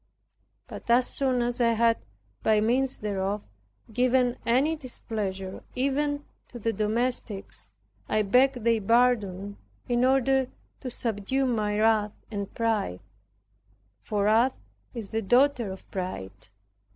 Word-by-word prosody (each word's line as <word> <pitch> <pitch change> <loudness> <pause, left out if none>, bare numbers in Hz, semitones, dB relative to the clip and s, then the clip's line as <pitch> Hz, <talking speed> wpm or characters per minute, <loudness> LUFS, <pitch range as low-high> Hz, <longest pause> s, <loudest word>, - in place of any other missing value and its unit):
But - - -10
as 245 +1 +5
soon 255 -3 0
as 240 +1 -1
I 230 -1 +4
had 230 0 +3 0.4
by 215 -1 +3
means 250 +5 +1
thereof, 200 0 -2 0.5
given 250 +1 +3
any 270 +7 +3
displeasure, 205 -8 -5
even 285 +2 0 0.2
to 245 - -10
the 225 0 -1
domestics, 220 -1 -1 0.4
I 215 0 +2
begged 250 +3 +3
their 230 -1 +3
pardon, 205 -4 +2 0.3
in 240 0 +2
order 265 0 +3 0.3
to 260 - -5
subdue 235 +3 -1
my 210 -4 0
wrath 215 -1 +3 0.2
and 200 -2 -4
pride; 220 - -1 1.0
for 205 -1 -1
wrath 225 +5 +3 0.4
is 220 -4 -6
the 225 - -1
daughter 245 0 +3
of 190 - -10
pride. 110 - -5
230 Hz, 125 wpm, -27 LUFS, 205-255 Hz, 1.0 s, as